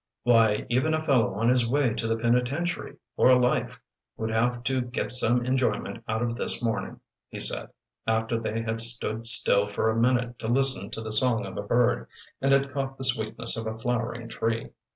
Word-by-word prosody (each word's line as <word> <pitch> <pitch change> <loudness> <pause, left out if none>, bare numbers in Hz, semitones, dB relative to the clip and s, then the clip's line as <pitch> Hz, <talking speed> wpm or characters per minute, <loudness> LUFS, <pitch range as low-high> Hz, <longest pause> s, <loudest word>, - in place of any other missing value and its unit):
"Why, 115 -3 +3
even 130 +7 +1
a 155 - -2
fellow 125 -10 +2
on 115 +3 +1
his 125 -2 +2
way 135 -3 +2
to 115 - -3
the 115 0 0
penitentiary 125 +9 -1 0.2
for 130 - +5
life 125 0 0 0.4
would 110 0 -3
have 120 +2 0
to 130 0 0
get 125 +1 -3
some 120 0 +3
enjoyment 130 -2 -1
out 110 +2 -1
of 115 -1 -2
this - - -2
morning," 115 -2 -3 0.3
he - - -8
said, - - -3 0.4
after 110 +1 0
they 115 0 -3
had 115 0 -1
stood 115 -1 -2
still 105 -3 +4
for 105 +2 0
a - - -2
minute 120 0 +1
to 110 - -5
listen 130 -4 +3
to 110 - -6
the 110 -1 -6
song 115 +1 +3
of - - -8
a - - -3
bird, 120 +4 +1 0.3
and 135 +1 +2
had 140 0 +2
caught 135 -1 -3
the 135 - -7
sweetness 115 -2 0
of 115 0 -4
a 110 0 -4
flowering 120 0 -3
tree. 115 0 -3
120 Hz, 195 wpm, -26 LUFS, 115-125 Hz, 0.4 s, for